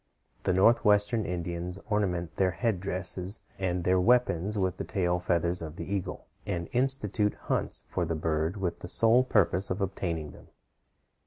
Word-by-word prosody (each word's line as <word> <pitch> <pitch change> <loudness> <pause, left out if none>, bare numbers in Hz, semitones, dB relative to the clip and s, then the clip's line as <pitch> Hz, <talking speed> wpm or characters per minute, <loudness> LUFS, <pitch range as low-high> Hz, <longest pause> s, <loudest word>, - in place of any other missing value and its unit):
The 95 - +2
Northwestern 105 +2 +3
Indians 85 +1 -4
ornament 90 -6 -1
their 95 -1 +3
headdresses 95 0 -1 0.2
and 90 -2 -1
their 90 +1 +3
weapons 105 -2 +2
with 95 -2 0
the - - -4
tail 90 -2 0
feathers 85 0 0
of 80 -1 -7
the 100 +1 -5
eagle, 95 -2 -4 0.2
and 85 -4 -2
institute 120 -5 +1
hunts - - -1
for 90 - -2
the 80 0 -2
bird 80 +4 -1
with 90 -3 -3
the - - -7
sole 115 +6 +5
purpose 100 -6 +2
of 90 - -2
obtaining 85 -6 -3
them. - - -16
90 Hz, 155 wpm, -28 LUFS, 85-105 Hz, 0.2 s, sole